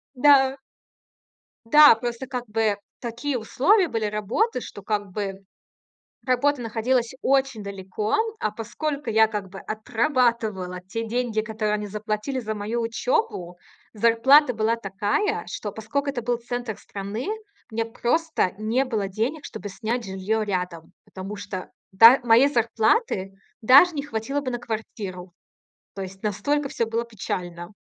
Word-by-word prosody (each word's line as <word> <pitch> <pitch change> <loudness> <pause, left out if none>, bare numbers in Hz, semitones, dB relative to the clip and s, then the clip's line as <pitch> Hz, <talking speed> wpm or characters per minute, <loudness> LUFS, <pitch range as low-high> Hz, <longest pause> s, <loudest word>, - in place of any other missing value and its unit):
Да. 270 0 +5 1.1
Да, 295 +2 +8
просто 240 +2 -5
как 250 -1 -4
бы 215 -1 +1 0.2
такие 245 +3 -3
условия 345 - +3
были 225 -5 -2
работы, 215 - 0
что 205 - -9
как 205 0 -1
бы 195 -1 -5 0.8
работа 265 +2 +2
находилась 230 +2 0
очень 270 -5 +1
далеко. 200 +1 -3 0.2
А 215 - -1
поскольку 275 +6 -4
я 220 0 +5
как 210 -3 -5
бы 195 +1 -9
отрабатывала 220 -5 0
те 225 +5 -5
деньги, 235 -1 -1
которые 215 -1 -2
они 210 0 -2
заплатили 215 +5 -3
за 220 -3 -3
мою 215 +3 -3
учёбу, 230 - -1 0.4
зарплата 235 +6 +5
была 220 +1 +1
такая, 205 - -1
что, 205 - -5
поскольку 255 +7 -3
это 255 -3 -3
был 240 +1 0
центр 240 -2 -5
страны, 200 +4 -6 0.4
у - - -9
меня 225 0 0
просто 245 - 0
не 230 +5 +1
было 220 -6 -2
денег, 230 +10 -2
чтобы 215 -2 -7
снять 230 +4 -3
жильё 195 +3 -1
рядом. 180 -5 -4
Потому 195 +2 -7
что 200 -2 -7 0.3
та 235 +4 +10
моей 240 +4 +6
зарплаты 230 - +1 0.3
даже 280 +9 +7
не 285 - -2
хватило 275 +1 -3
бы 260 -2 -3
на 240 - -3
квартиру. 200 -6 -6 0.6
То 195 - -4
есть 190 +1 -10
настолько 285 +8 -1
всё 230 - -1
было 230 +1 -2
печально. 175 -5 -5
225 Hz, 140 wpm, -24 LUFS, 205-255 Hz, 1.1 s, та